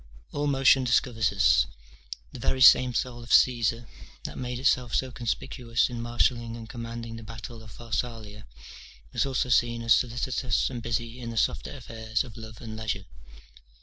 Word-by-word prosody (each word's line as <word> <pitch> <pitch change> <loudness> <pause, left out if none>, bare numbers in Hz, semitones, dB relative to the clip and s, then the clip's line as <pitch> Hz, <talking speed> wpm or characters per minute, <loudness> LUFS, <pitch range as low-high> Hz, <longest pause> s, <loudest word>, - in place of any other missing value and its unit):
All 145 0 -1
motion 135 -1 +4
discovers 120 -3 +2
us: 85 -12 +4 0.7
the 130 - -8
very 130 - 0
same 125 -1 +7
soul 120 -1 -2
of 120 - -10
Caesar, 115 -2 +3 0.4
that - - -6
made 125 -1 -4
itself 125 -2 +1
so 130 -1 0
conspicuous 120 0 -1
in 120 -1 -4
marshalling 120 0 0
and 115 -1 -9
commanding 115 -1 -7
the - - -9
battle 115 +1 -9
of 110 - -13
Pharsalia, 110 -2 -5 0.7
was - - +1
also 130 -1 -1
seen 120 -1 +2
as 115 +1 +5
solicitous 125 +1 0
and 120 -2 -5
busy 115 +1 -3
in 120 -2 -6
the 115 - -6
softer 145 - -1
affairs 115 -2 -3
of 120 -5 -12
love 110 -1 -10
and 110 -2 -7
leisure. 110 -3 -3
120 Hz, 165 wpm, -27 LUFS, 115-125 Hz, 0.7 s, same